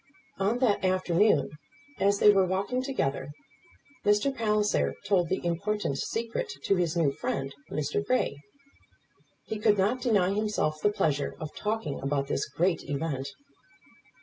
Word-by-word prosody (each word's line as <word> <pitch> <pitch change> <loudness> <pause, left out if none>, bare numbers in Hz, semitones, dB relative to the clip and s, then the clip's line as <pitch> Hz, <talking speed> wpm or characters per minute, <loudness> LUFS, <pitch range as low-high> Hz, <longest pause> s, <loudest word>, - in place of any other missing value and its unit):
On 200 +5 +1
that 245 -7 +2
afternoon, 185 -3 +2 0.5
as 200 +1 +3
they 210 - +7
were 195 -2 +3
walking 200 +7 -1
together, 145 - -2 0.7
Mr. 210 +7 +2
Palliser 210 -2 +1
told 180 -4 +2
the 190 - -2
important 175 -3 -1
secret 235 - -3
to 195 - +2
his 175 -2 0
new 155 -5 +3
friend, 135 0 -3 0.2
Mr. 150 +7 -1
Grey. 205 - 0 1.1
He 215 - -4
could 210 -1 +3
not 210 +7 +1
deny 205 -7 +2
himself 205 -8 -1
the 205 - +4
pleasure 145 -8 0
of 155 -2 -6
talking 210 -9 -2
about 140 0 0
this 140 - -1
great 175 +1 0
event. 140 -2 -2
195 Hz, 140 wpm, -28 LUFS, 155-210 Hz, 1.1 s, they